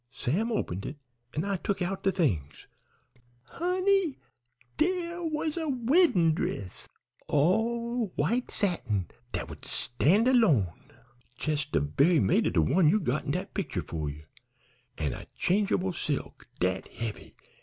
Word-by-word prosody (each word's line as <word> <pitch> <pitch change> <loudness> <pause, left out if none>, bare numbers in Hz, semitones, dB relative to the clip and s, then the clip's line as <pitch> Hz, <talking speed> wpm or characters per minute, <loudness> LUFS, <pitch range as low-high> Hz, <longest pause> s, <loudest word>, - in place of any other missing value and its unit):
Sam 165 - -1
opened 95 - -2
it, 145 - -6 0.4
an' 155 +5 -1
I 200 -1 0
tuk 195 +2 -2
out 190 +2 -2
de 195 - +2
things. 110 - -1 0.8
Honey! 365 - +1 0.6
dere 350 +1 0
was 310 0 -2
a 320 -2 -1
weddin' 245 - +4
dress 100 - -4 0.4
all 230 - +1
white 230 +13 0
satin 110 - -1 0.2
dat - - -3
would - - -10
stand 180 - +2
alone, 140 - +3 0.5
jes' 150 -2 0
de - - 0
ve'y 140 - +3
mate 95 - +3
of - - -1
de 80 - +4
one 170 - +4
you 210 +6 +4
got 140 -5 -1
in - - -4
dat 185 +3 -4
picter 140 - -2
'fore 75 -1 -3
ye, 75 +1 -9 0.7
an' 75 -5 -1
a - - -9
change'ble 190 -1 +1
silk, 150 -3 -4
dat 95 +1 0
heavy! 115 -3 -6
180 Hz, 145 wpm, -29 LUFS, -, 0.8 s, weddin